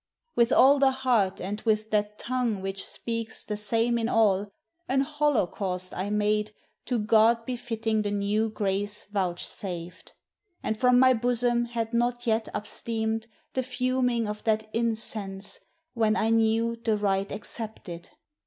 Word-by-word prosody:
With 235 +1 +3
all 275 +2 +6
the 270 -1 +5
heart, 250 -7 +1
and 205 +3 -4
with 215 -1 0
that 210 0 0
tongue 245 -4 -1
which 195 0 -3
speaks 230 -1 -4
The 210 - -3
same 230 +3 +1
in 230 0 -1
all, 205 -3 +2 0.4
an 265 +1 +3
holocaust 220 - -1
I 190 +3 -2
made 210 0 0 0.3
To 245 - 0
God 225 +1 +4
befitting 225 -3 -1
the 205 - -1
new 205 +2 0
grace 205 0 -2
vouchsafed. 180 -2 -4 0.5
And 220 - 0
from 250 +2 +4
my 255 0 +6
bosom 240 0 +2
had 230 -1 -3
not 240 +1 +1
vet 225 -2 +1
upsteamed 220 +1 -3 0.3
The 260 - +1
fuming 250 -2 0
of 210 0 -5
that 220 -1 0
incense, 215 -4 -3 0.3
when 220 -2 +2
I 220 +1 +1
knew 225 +1 +2
The 220 -3 +2
rite 195 -1 0
accepted. 205 -5 -5
220 Hz, 145 wpm, -27 LUFS, 205-235 Hz, 0.5 s, all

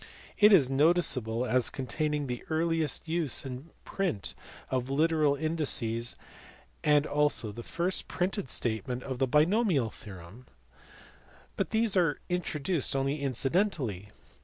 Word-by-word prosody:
329): 210 0 +7
it 195 - +9
is 140 -6 +2
noticeable 135 -6 +2
as 125 -1 +2
containing 150 +2 -2
the 125 -2 -5
earliest 165 0 0
use 160 -4 -1
in 130 +4 -8 0.2
print 180 - -2 0.4
of 130 0 -2
literal 155 0 +2
indices, 135 -7 +1 0.7
and 150 -1 +3
also 145 -8 +2
the 120 - -8
first 175 +9 -2
printed 185 - -2
statement 120 +3 -2
of 130 -2 -5
the 135 - +2
binomial 155 - +2
theorem, 100 +4 -13 1.1
but - - -2
these 220 -2 +1
are 170 -6 +2
introduced 165 -4 -1
only 135 +2 -1
incidentally. 135 - -1
145 Hz, 125 wpm, -29 LUFS, 125-165 Hz, 1.1 s, it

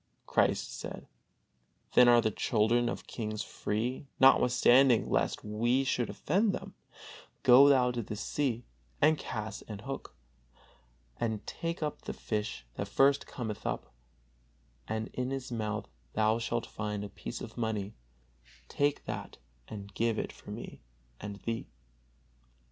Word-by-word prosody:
Christ - - +1
said: - - -7 0.9
"Then 125 - +8
are 120 -1 +7
the 110 -1 +1
children 120 +3 +2
of - - -5
kings 110 -2 -4
free; 120 +6 -3
notwithstanding, 125 -1 +6
lest - - +1
we 120 +5 +1
should 125 -3 0
offend 200 +1 +1
them, - - -6 0.7
go 130 +3 +8
thou 125 -3 +5
to 120 -1 -2
the 105 - -5
sea, 120 +1 -1 0.3
and 155 +2 +5
cast 110 -7 -5
an 105 - -6
hook, 135 +7 -7 1.0
and 110 -2 -2
take 165 -1 -3
up 150 - -3
the - - -5
fish 105 - -3
that 100 - -2
first 135 +6 +3
cometh 110 -4 -5
up; - - -3 0.9
and 110 0 -2
in 125 0 -2
his 135 -1 -4
mouth 110 -2 -2 0.3
thou 110 +1 +2
shalt 115 0 -1
find 105 -1 -4
a 105 - -6
piece - - -7
of - - -8
money; 110 -3 -2 0.7
take 145 - 0
that - - -5 0.3
and 100 -2 -8
give 115 +1 +1
it - - -2
for - - -14
me - - -7 0.4
and 100 0 -6
thee." 115 0 -3
115 Hz, 140 wpm, -31 LUFS, 110-130 Hz, 1.0 s, Then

